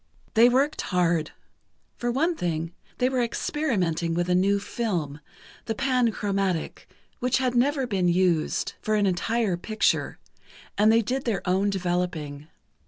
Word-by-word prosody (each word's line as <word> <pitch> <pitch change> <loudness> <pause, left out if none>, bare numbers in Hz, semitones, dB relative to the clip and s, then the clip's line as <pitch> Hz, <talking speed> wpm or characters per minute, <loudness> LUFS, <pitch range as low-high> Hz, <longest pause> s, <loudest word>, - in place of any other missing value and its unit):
They 230 +2 +6
worked 275 +5 +1
hard. 170 -3 +1 0.7
For 240 0 -2
one 325 +8 +1
thing, 165 - -3 0.2
they 250 - +2
were 260 -1 0
experimenting 190 - -1
with 175 +1 -1
a - - +3
new 195 +3 +3
film, 175 -10 -3 0.5
the 225 - -2
panchromatic, 210 - -1 0.3
which 250 0 +1
had 255 -2 0
never 270 +2 +2
been 195 -6 0
used 175 -2 +1
for 215 - 0
an 205 -1 +2
entire 195 +1 0
picture, 215 +4 0 0.6
and 210 +2 +4
they 225 +1 +4
did 255 +5 -2
their 205 -6 -2
own 190 +3 +2
developing. 175 -6 -2
200 Hz, 140 wpm, -25 LUFS, 175-240 Hz, 0.7 s, They